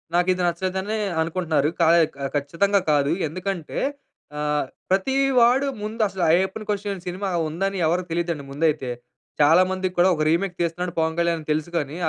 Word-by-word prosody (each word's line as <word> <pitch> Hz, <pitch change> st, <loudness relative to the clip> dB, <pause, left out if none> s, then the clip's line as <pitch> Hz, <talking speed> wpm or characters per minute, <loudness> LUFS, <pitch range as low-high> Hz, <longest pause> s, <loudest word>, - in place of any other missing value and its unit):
నాకిది 180 Hz, +1 st, +2 dB
నచ్చలేదనే 190 Hz, +4 st, -2 dB, 0.2 s
అనుకుంటున్నారు. 160 Hz, -3 st, 0 dB
ఖ -, -, +4 dB, 0.5 s
ఖచ్చితంగా 170 Hz, +8 st, +1 dB
కాదు. 145 Hz, -1 st, +2 dB, 0.2 s
ఎందుకంటే 180 Hz, +1 st, -4 dB, 0.6 s
ఆహ్, 150 Hz, -1 st, 0 dB, 0.2 s
ప్రతీ 195 Hz, +8 st, +1 dB, 0.2 s
వాడు 250 Hz, +4 st, +4 dB, 0.2 s
ముందసల 210 Hz, -4 st, -2 dB
'అయ్యప్పన్ 190 Hz, +5 st, 0 dB
కోషియం' 200 Hz, -2 st, -2 dB
సినిమా 190 Hz, +2 st, -3 dB, 0.2 s
ఉందని 195 Hz, +4 st, -2 dB
ఎవరికీ 175 Hz, +2 st, 0 dB
తెలియదండి 170 Hz, -4 st, -2 dB
ముందైతే. 145 Hz, -2 st, 0 dB, 0.5 s
చాలా 160 Hz, +5 st, +6 dB
మందికి 185 Hz, -1 st, -2 dB
కూడా 180 Hz, +2 st, +5 dB
ఒక 155 Hz, -, 0 dB
రీమేక్ 175 Hz, +3 st, 0 dB
తీస్తున్నాడు 170 Hz, +1 st, -2 dB
'పవన్ 160 Hz, 0 st, 0 dB
కళ్యాణ్' 170 Hz, -1 st, +1 dB
అని 155 Hz, -1 st, -12 dB
తెలుసు 155 Hz, +2 st, -1 dB
కానీ 150 Hz, 0 st, -3 dB
175 Hz, 145 wpm, -23 LUFS, 160-195 Hz, 0.6 s, చాలా